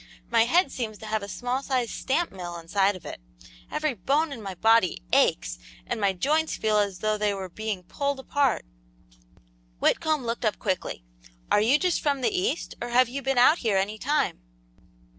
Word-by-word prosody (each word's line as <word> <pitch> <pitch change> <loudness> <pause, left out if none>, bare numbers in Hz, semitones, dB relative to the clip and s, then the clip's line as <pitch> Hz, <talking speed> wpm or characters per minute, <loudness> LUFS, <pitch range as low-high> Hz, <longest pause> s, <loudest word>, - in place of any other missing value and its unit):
"My 230 -1 +5
head 350 +9 +3
seems 220 -4 -4
to 220 - -10
have 215 0 -1
a 200 - -6
small 245 +5 -2
sized 255 -4 -1
stamp 330 +6 -1
mill 175 -2 -6
inside 195 +4 +1
of 185 - -12
it; - - -7 0.5
every 305 -2 -1
bone 285 - 0
in 245 -5 -7
my 195 -2 -6
body 225 - +3
aches, - - +2 0.3
and - - -3
my 200 -1 +3
joints 300 - 0
feel 215 -1 +2
as 200 -3 -1
though 215 0 0
they 210 -1 +1
were 190 -1 -6
being 210 0 -4
pulled 280 +9 -2
apart." 275 - 0 1.1
Whitcomb 310 - +1
looked 230 +1 -3
up 215 -2 +1
quickly. 185 - -3 0.5
"Are 205 - +5
you 245 +7 +4
just 360 +2 0
from 280 -3 0
the 395 - +1
East, 375 +5 -1
or 240 - -3
have 245 0 +4
you 275 +3 -4
been 270 0 -1
out 275 +7 +6
here 215 -5 +1
any 205 +3 -1
time?" 290 - 0
230 Hz, 190 wpm, -26 LUFS, 200-275 Hz, 1.1 s, out